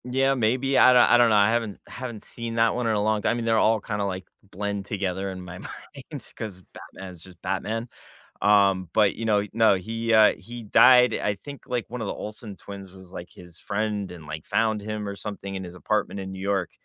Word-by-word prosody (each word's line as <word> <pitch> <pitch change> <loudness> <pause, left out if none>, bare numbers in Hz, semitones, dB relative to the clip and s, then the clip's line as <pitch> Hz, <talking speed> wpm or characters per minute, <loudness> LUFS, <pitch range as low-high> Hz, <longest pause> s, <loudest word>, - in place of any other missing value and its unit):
Yeah, 135 +2 +1
maybe, 130 +3 +1
I 130 - +7
don't 125 - +7
I 120 - +5
don't 120 -1 +5
know, 110 - +3
I 100 +1 +5
haven't 115 -4 -2
haven't 120 -4 -7
seen 115 -1 -6
that 115 0 +3
one 125 -1 -2
in 110 - +1
a 105 - +1
long 110 0 +1
time. - - +1
I - - +1
mean, 120 -1 -3
they're 115 -1 +2
all 110 0 +3
kinda, 105 0 -3
like, 95 -1 -4 0.2
blend 100 0 -4
together 95 -1 -3
in 95 -1 -7
my 90 0 -9
mind 140 +3 -10
'cause 100 -5 -7
Batman 95 - -10
is 90 -3 -14
just 90 -1 -15
Batman. 110 +5 -2 0.6
Um, 100 -4 +3
but, 105 -3 +3
you 115 - -5
know 105 -2 +2
no, 110 -2 +5
he, 115 +5 -3
uh, 110 -1 +6
he 120 0 -10
died 125 +4 +6
I 105 -1 -1
think, 140 +6 -10
like, 120 -2 -3
one 125 -1 -5
of 105 - -3
the - - -2
Olsen 105 -1 -8
twins 100 -1 -10
was, 95 -1 -14
like, 85 - -8
his 85 -1 -14
friend 105 -2 -3
and, 85 -4 -11
like, 75 +1 -7
found 110 -2 0
him 105 0 -4
or 100 - -5
something 100 -1 -6
in 95 -1 -5
his 90 0 -9
apartment 105 +1 -1
in 95 0 -6
New 95 - -8
York, 95 -3 -1
105 Hz, 235 wpm, -25 LUFS, 95-115 Hz, 0.6 s, I